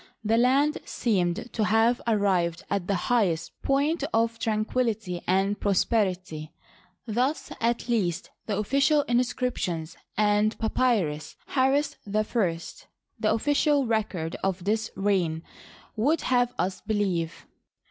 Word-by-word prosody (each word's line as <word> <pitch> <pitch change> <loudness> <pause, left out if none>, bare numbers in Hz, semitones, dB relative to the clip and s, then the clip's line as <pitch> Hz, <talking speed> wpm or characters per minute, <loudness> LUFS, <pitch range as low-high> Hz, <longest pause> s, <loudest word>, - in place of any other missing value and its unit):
The 220 +1 +2
land 275 +5 +3
seemed 190 -1 -1
to 215 - +1
have 225 +3 +3
arrived 185 -6 +1
at 200 -3 -1
the 200 - +1 0.2
highest 180 -9 +1
point 285 +3 +1
of 230 0 +1
tranquillity 215 -4 -1
and 195 +2 +1
pros 200 -2 +2
perity. 185 -8 -1 0.6
Thus, 250 +7 -1
at 235 +2 0
least, 200 -9 -1 0.2
the 205 -3 -1
official 275 +7 +3
inscriptions 240 - -1 0.2
and 210 +1 +2
Papyrus 220 -10 0
Harris 280 +2 +1
I, - - -7 1.1
the - - +2
official 285 +4 +2
record 205 -8 -1
of 190 -2 -1
this 220 +3 0
reign, 180 -5 0 0.5
would 290 +9 +2
have 245 -1 +2
us 185 +1 -2
believe. 190 -6 -1
215 Hz, 115 wpm, -26 LUFS, 185-245 Hz, 1.1 s, land